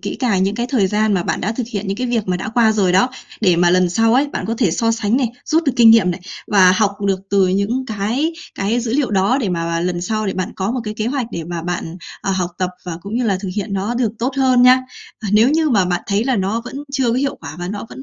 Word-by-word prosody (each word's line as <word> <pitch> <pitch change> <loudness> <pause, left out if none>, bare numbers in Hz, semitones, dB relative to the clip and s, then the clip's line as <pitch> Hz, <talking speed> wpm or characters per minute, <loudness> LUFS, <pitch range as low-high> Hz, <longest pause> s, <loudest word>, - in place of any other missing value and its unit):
kỹ - - -5
càng 210 -8 +1
những 195 +2 0
cái 240 +2 -2
thời 245 -6 +1
gian 210 +2 +1
mà 180 - 0
bạn - - -2
đã 210 - -1
thực 235 0 -4
hiện 205 -2 -4
những 195 0 -2
cái 250 +2 -2
việc 230 -4 -1
mà 180 - +1
đã 190 - -5
qua 225 0 +3
rồi 195 -4 +2
đó. 190 +7 +4 0.3
Để 180 -6 +3
mà 175 0 +4
lần 180 0 +3
sau 225 +5 +2
ấy, 275 +3 +3
bạn 285 - -5
có 225 - -1
thể 215 -9 +2
so 230 +7 +1
sánh 225 0 0
này, 260 -3 +1 0.2
rút 325 +2 +2
được 275 - +1
kinh 230 -2 +7
nghiệm 220 -5 +5
này 175 - -5 0.3
và 185 -3 +5
học 200 0 +1
được 190 -1 0
từ 195 -2 +3
những 200 +8 -1
cái 225 +9 -1 0.2
cái 220 +5 0
dữ 230 -1 -3
liệu 280 -4 +1
đó. 200 +6 +2
Để 220 - -1
mà 180 - -1
mà 170 0 -1
lần 175 0 -2
sau 215 +4 -2
để 195 - -1
bạn 185 -1 -4
có 190 +2 -1
một 250 0 -2
cái 210 -1 -4
kế 215 +1 -3
hoạch 255 -2 -1
để 170 - -4
mà 170 0 -5
bạn, 175 -1 -4 0.3
à, 195 - -1
học 180 -2 -1
tập 185 -1 -1
và 175 -2 -5
cũng 200 +2 -6
như 245 - 0
là 200 -4 +1
thực 195 - -5
hiện 205 0 -3
nó 195 +4 -2
được 235 -3 0
tốt 260 +3 -2
hơn 255 -2 +4
nha. 255 +1 +7 0.4
Và 215 - -3
nếu 215 +4 +5
như 310 0 +2
mà 200 -6 +3
bạn 180 -1 -1
thấy 205 +3 0
là 260 -2 +1
nó 200 +4 -1
vẫn 245 - -8 0.2
chưa 265 -3 +1
có - - 0
hiệu 275 +1 -1
quả 155 -1 -8
và 175 0 -4
nó 205 +2 -5
vẫn 265 - -10
210 Hz, 300 wpm, -18 LUFS, 190-240 Hz, 0.4 s, kinh